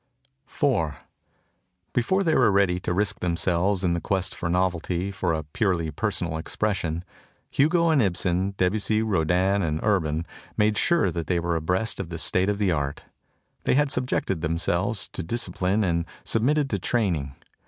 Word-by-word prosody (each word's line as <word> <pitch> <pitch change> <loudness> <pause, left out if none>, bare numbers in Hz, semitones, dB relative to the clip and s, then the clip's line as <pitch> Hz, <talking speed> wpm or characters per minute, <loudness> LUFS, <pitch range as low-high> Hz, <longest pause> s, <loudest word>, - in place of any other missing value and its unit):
IV 120 - 0 1.0
BEFORE 190 +12 +2
they 165 -3 +2
were 125 -8 +4
ready 95 -2 +3
to 90 - -3
risk 100 +2 0
themselves 90 +2 +1
in 90 -2 +2
the 85 - -1
quest 95 +2 -1
for 85 - -4
novelty 90 +1 0
for 95 -3 -1
a 80 -1 -1
purely 85 +1 -1
personal 85 -2 -2
expression, 90 -3 -2 0.5
Hugo 165 +4 +3
and 150 -4 +4
Ibsen, 95 0 0
Debussy, 110 +4 +1
Rodin 95 0 +2
and 80 -3 -1
Urban 85 -6 +1 0.3
made 105 0 +3
sure 165 - +2
that 85 0 -4
they 90 -2 +1
were 85 0 -1
abreast 90 +8 0
of 95 -4 -4
the 85 - -5
state 90 +4 +1
of 105 - 0
the 100 -3 +2
art. 70 -3 -2 0.6
They - - +3
had 145 0 +2
subjected 125 -8 -1
them 80 0 0
selves 90 +5 -1
to - - -5
discipline 100 0 -1
and 85 -3 0 0.2
submitted 140 +6 +1
to 100 - 0
training. 85 - -1
95 Hz, 165 wpm, -25 LUFS, 85-105 Hz, 1.0 s, were